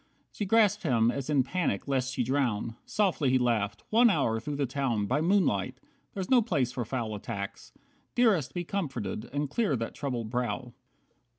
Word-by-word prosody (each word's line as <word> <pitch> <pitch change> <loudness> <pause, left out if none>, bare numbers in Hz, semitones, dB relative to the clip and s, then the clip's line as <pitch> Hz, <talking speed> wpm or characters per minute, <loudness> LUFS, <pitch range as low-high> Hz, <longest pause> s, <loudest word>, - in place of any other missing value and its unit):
She 205 - -3
grasped 210 -1 +4
him 120 -7 +3
as 140 +1 -4
in 140 -3 +3
panic 155 - -1
lest 130 -2 0
she 130 - -1
drown. 120 -4 0
Softly 185 -9 +1
he 130 - +4
laughed, 115 -5 0
"One 235 +2 +6
hour 115 - +1
through 145 +6 -4
the 140 0 0
town 125 -5 -1
By 130 +8 +1
moonlight! 140 - +1 0.4
That's 190 -2 -3
no 255 -2 +5
place 145 - 0
for 125 - -3
foul 115 -2 -3
attacks. 100 -1 -6 0.4
Dearest, 195 - +2
be 175 - -1
comforted, 130 - -4
and 145 +2 -1
clear 195 - 0
that 115 -1 -3
troubled 120 -6 -4
brow. 125 0 -2
130 Hz, 175 wpm, -29 LUFS, 115-175 Hz, 0.4 s, One